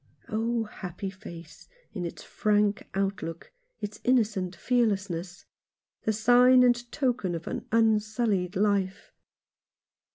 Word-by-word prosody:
Oh, 230 Hz, +1 st, 0 dB
happy 195 Hz, -2 st, -6 dB
face, 170 Hz, -5 st, -12 dB, 0.3 s
in 180 Hz, -4 st, -3 dB
its -, -, -9 dB
frank 210 Hz, 0 st, +1 dB
outlook, 195 Hz, -4 st, -3 dB, 0.3 s
its 210 Hz, 0 st, -5 dB
innocent 210 Hz, -7 st, +1 dB
fearlessness 195 Hz, -6 st, -1 dB, 0.3 s
— -, -, -56 dB
the 220 Hz, -, +3 dB
sign 245 Hz, +4 st, +6 dB
and 240 Hz, -1 st, +2 dB
token 240 Hz, -, 0 dB
of 165 Hz, -, -6 dB
an -, -, -5 dB
unsullied 215 Hz, -3 st, +1 dB
life 200 Hz, -1 st, 0 dB
210 Hz, 110 wpm, -28 LUFS, 185-230 Hz, 0.3 s, sign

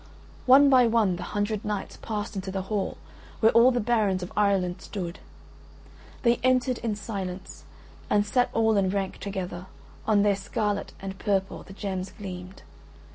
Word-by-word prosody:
One 275 Hz, +3 st, +8 dB
by 255 Hz, -3 st, +6 dB
one 220 Hz, -6 st, +2 dB
the -, -, -7 dB
hundred 205 Hz, +3 st, -2 dB
knights 210 Hz, -2 st, -3 dB
passed 210 Hz, -1 st, -4 dB
into 190 Hz, 0 st, -4 dB
the 190 Hz, 0 st, -3 dB
hall 200 Hz, 0 st, -2 dB, 0.4 s
where 220 Hz, -, +5 dB
all 235 Hz, +2 st, +6 dB
the 245 Hz, -1 st, +1 dB
barons 210 Hz, -5 st, +1 dB
of 180 Hz, -, -8 dB
Ireland 190 Hz, -3 st, +1 dB
stood, 175 Hz, -4 st, -6 dB, 1.0 s
they 235 Hz, -1 st, +4 dB
entered 255 Hz, 0 st, +1 dB
in 225 Hz, -3 st, -2 dB
silence 195 Hz, -3 st, -6 dB, 0.4 s
and 205 Hz, 0 st, +3 dB
sat 245 Hz, +4 st, +2 dB
all 220 Hz, -1 st, +2 dB
in 190 Hz, -2 st, +2 dB
rank 195 Hz, -1 st, -2 dB
together: 185 Hz, -2 st, -5 dB, 0.4 s
on 210 Hz, -2 st, +4 dB
their 205 Hz, -1 st, +3 dB
scarlet 200 Hz, +1 st, -2 dB
and 190 Hz, 0 st, -6 dB
purple 195 Hz, -2 st, -1 dB
the 195 Hz, -, -12 dB
gems 190 Hz, -2 st, -4 dB
gleamed. 185 Hz, -2 st, -8 dB
205 Hz, 160 wpm, -26 LUFS, 190-220 Hz, 1.0 s, One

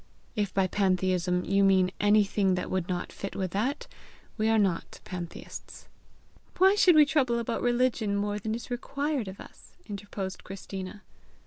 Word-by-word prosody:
If 205 Hz, -3 st, 0 dB
by 195 Hz, 0 st, +2 dB
pantheism 185 Hz, -2 st, +1 dB
you 200 Hz, 0 st, +3 dB
mean 190 Hz, -2 st, +4 dB
anything 205 Hz, -2 st, +3 dB
that 180 Hz, -, -4 dB
would 185 Hz, -2 st, -1 dB
not 180 Hz, -1 st, -3 dB
fit 195 Hz, -, -6 dB
with 185 Hz, -2 st, -2 dB
that, 250 Hz, -, -1 dB, 0.5 s
we 215 Hz, 0 st, +1 dB
are 225 Hz, -, +4 dB
not 190 Hz, -5 st, 0 dB
pantheists." 175 Hz, -2 st, -8 dB, 0.7 s
"Why 380 Hz, +2 st, +6 dB
should 370 Hz, -4 st, +5 dB
we 305 Hz, -1 st, +8 dB
trouble 270 Hz, -5 st, +2 dB
about 235 Hz, 0 st, -2 dB
religion 240 Hz, -4 st, +1 dB
more 205 Hz, +1 st, -1 dB
than 220 Hz, +2 st, -2 dB
is 235 Hz, +2 st, -8 dB
required 280 Hz, 0 st, -2 dB
of 190 Hz, +1 st, -8 dB
us!" -, -, -14 dB
interposed 200 Hz, -2 st, -6 dB
Christina. 190 Hz, 0 st, -7 dB
200 Hz, 155 wpm, -28 LUFS, 190-235 Hz, 0.7 s, we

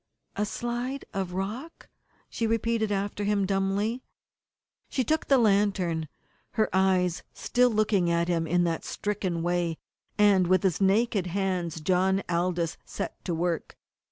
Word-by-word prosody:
"A 210 Hz, +1 st, 0 dB
slide 240 Hz, +5 st, -3 dB
of 190 Hz, -3 st, -3 dB
rock," 220 Hz, -, -5 dB, 0.4 s
she 230 Hz, -, -2 dB
repeated 225 Hz, -1 st, 0 dB
after 205 Hz, +1 st, -2 dB
him 200 Hz, -1 st, +1 dB
dumbly. 200 Hz, +5 st, 0 dB, 0.9 s
She 260 Hz, -, 0 dB
took 315 Hz, +6 st, 0 dB
the 275 Hz, -, +5 dB
lantern, 195 Hz, -7 st, +2 dB, 0.5 s
her 220 Hz, -2 st, +1 dB
eyes 185 Hz, -2 st, +2 dB
still 250 Hz, 0 st, +2 dB
looking 210 Hz, -5 st, +2 dB
at 170 Hz, 0 st, +1 dB
him 165 Hz, -2 st, 0 dB
in 175 Hz, +1 st, +2 dB
that 165 Hz, -1 st, -1 dB
stricken 205 Hz, -9 st, -2 dB
way, 175 Hz, -2 st, 0 dB, 0.4 s
and 200 Hz, -4 st, +5 dB
with 185 Hz, 0 st, +3 dB
his 190 Hz, -1 st, +1 dB
naked 200 Hz, 0 st, +2 dB
hands 180 Hz, -3 st, -1 dB
John 190 Hz, +3 st, +2 dB
Aldous 170 Hz, -1 st, 0 dB
set -, -, -6 dB
to 175 Hz, -, -1 dB
work. 170 Hz, 0 st, -2 dB
195 Hz, 140 wpm, -27 LUFS, 175-215 Hz, 0.9 s, the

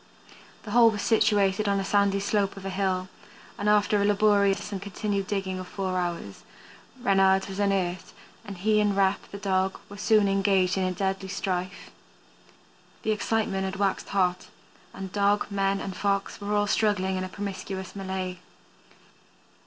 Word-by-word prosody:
The 210 Hz, -, -8 dB
hole 235 Hz, 0 st, +7 dB
was 210 Hz, -2 st, -3 dB
situated 205 Hz, -2 st, +2 dB
on 200 Hz, -, +2 dB
the 195 Hz, -, -1 dB
sandy 200 Hz, 0 st, +2 dB
slope 200 Hz, 0 st, 0 dB
of 195 Hz, -, -9 dB
a 195 Hz, -, -3 dB
hill, 185 Hz, -1 st, -1 dB, 0.5 s
and 205 Hz, -, -1 dB
after 210 Hz, 0 st, +3 dB
a -, -, +2 dB
laborious 205 Hz, -1 st, +2 dB
and 195 Hz, -2 st, -4 dB
continued 200 Hz, 0 st, -3 dB
digging 190 Hz, -2 st, -2 dB
of 185 Hz, -, -7 dB
four 190 Hz, -1 st, -3 dB
hours, 170 Hz, -, -4 dB, 0.6 s
Reynard 195 Hz, -2 st, +4 dB
was 195 Hz, 0 st, -6 dB
unearthed 190 Hz, -3 st, 0 dB, 0.3 s
and 200 Hz, -4 st, -8 dB
he 210 Hz, +3 st, +2 dB
and 205 Hz, -1 st, +1 dB
Rep, 195 Hz, 0 st, +3 dB
the 200 Hz, -, -7 dB
dog, 190 Hz, -1 st, 0 dB
were 205 Hz, -, -10 dB
soon 210 Hz, 0 st, +3 dB
engaged 195 Hz, -2 st, +2 dB
in 185 Hz, -1 st, 0 dB
deadly 190 Hz, 0 st, -2 dB
strife. 185 Hz, -1 st, -3 dB, 1.1 s
The 220 Hz, -, +1 dB
excitement 215 Hz, -2 st, 0 dB
had 190 Hz, 0 st, -3 dB
waxed 195 Hz, -1 st, -1 dB
hot, 180 Hz, -2 st, 0 dB, 0.4 s
and 190 Hz, -1 st, -7 dB
dog, 205 Hz, 0 st, +2 dB
men, 195 Hz, 0 st, +1 dB
and 190 Hz, -1 st, -5 dB
Fox 200 Hz, 0 st, -1 dB
were 205 Hz, +1 st, -1 dB
all 205 Hz, 0 st, +2 dB
struggling 200 Hz, -2 st, +1 dB
in 185 Hz, -, -2 dB
a 185 Hz, -, -5 dB
promiscuous 190 Hz, -1 st, -6 dB
melee. 190 Hz, -2 st, -4 dB
195 Hz, 160 wpm, -26 LUFS, 190-205 Hz, 1.1 s, hole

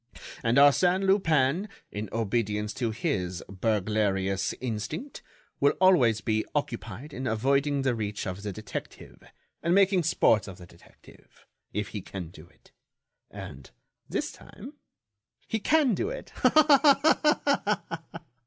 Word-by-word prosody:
And 115 Hz, -1 st, +1 dB
Arsène 175 Hz, +7 st, +5 dB
Lupin, 170 Hz, -2 st, +2 dB, 0.2 s
in 105 Hz, 0 st, -5 dB
obedience 105 Hz, -1 st, -1 dB
to 120 Hz, -1 st, -2 dB
his 100 Hz, -, -3 dB
burglarious 100 Hz, -1 st, 0 dB
instinct, 130 Hz, -, -5 dB, 0.4 s
will 140 Hz, -, +4 dB
always 130 Hz, -, +4 dB
be 110 Hz, -1 st, 0 dB
occupied 125 Hz, -1 st, -4 dB
in 130 Hz, +1 st, -4 dB
avoiding 135 Hz, +5 st, +1 dB
the 130 Hz, -2 st, +1 dB
reach 105 Hz, -3 st, -4 dB
of 90 Hz, 0 st, -5 dB
the 105 Hz, 0 st, -4 dB
detective, 110 Hz, +1 st, -8 dB, 0.4 s
and 170 Hz, +2 st, +2 dB
making 195 Hz, -2 st, +4 dB
sport 115 Hz, -, +2 dB
of 95 Hz, -2 st, -9 dB
the 90 Hz, -, -12 dB
detective, 85 Hz, 0 st, -20 dB, 0.3 s
if 105 Hz, 0 st, -3 dB
he 105 Hz, -, -6 dB
can 90 Hz, -3 st, -7 dB
do 80 Hz, -1 st, -14 dB
it. -, -, -26 dB, 0.6 s
And, 65 Hz, -1 st, -10 dB, 0.4 s
this -, -, -2 dB
time, -, -, -12 dB, 0.7 s
he 225 Hz, -, -1 dB
can 295 Hz, +2 st, +3 dB
do 370 Hz, -, -1 dB
it. -, -, -8 dB
Ha -, -, +2 dB
ha 290 Hz, -5 st, +4 dB
ha!" 165 Hz, 0 st, -9 dB
120 Hz, 135 wpm, -27 LUFS, -, 0.7 s, Arsène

